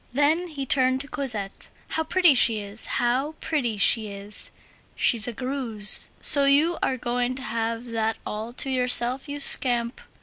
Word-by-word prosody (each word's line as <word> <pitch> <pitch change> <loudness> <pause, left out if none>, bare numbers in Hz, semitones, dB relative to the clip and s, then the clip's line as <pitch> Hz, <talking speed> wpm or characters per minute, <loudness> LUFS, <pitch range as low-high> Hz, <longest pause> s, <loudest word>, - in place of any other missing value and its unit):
Then 305 +6 0
he 290 -5 -7
turned 260 -1 0
to 280 - -10
Cosette. 225 -9 -5 0.2
"How 320 - -2
pretty 345 0 +2
she 235 -3 +4
is! 205 +1 -5
how 255 +5 -2
pretty 245 -9 -3
she 215 +2 +3
is! 200 +1 -5 0.5
She's 230 -3 +2
a - - -4
Greuze. 240 -4 -1
So 280 -1 +5
you 300 +5 +2
are 260 - -2
going 245 +1 -4
to 260 - -9
have 230 -1 -5
that 225 -1 -3
all 215 +2 -6
to 270 +2 -1
yourself, 250 +1 +1
you 290 0 -6
scamp! 245 -4 +5
250 Hz, 165 wpm, -22 LUFS, 225-280 Hz, 0.5 s, So